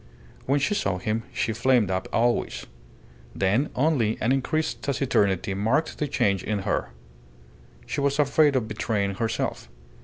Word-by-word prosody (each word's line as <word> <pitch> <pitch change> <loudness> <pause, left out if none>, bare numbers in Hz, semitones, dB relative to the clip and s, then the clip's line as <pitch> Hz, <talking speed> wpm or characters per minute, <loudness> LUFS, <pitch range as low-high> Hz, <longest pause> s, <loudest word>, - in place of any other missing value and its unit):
When 140 +2 +3
she 175 +9 +1
saw 100 - 0
him 110 +4 -2
she 110 - -1
flamed 115 -3 +2
up 95 0 -2
always. 120 +1 0 0.7
Then 105 +10 +1
only 130 -6 +1
an 115 - +1
increased 145 +4 -1
taciturnity 105 -9 +1
marked 115 +11 0
the 150 - 0
change 100 -8 +1
in 105 -2 -2
her. - - -1 1.0
She 140 - -3
was 140 0 +1
afraid 145 0 +3
of 120 -4 0
betraying 105 -2 -1
herself. 110 - -2
115 Hz, 145 wpm, -25 LUFS, 100-140 Hz, 1.0 s, When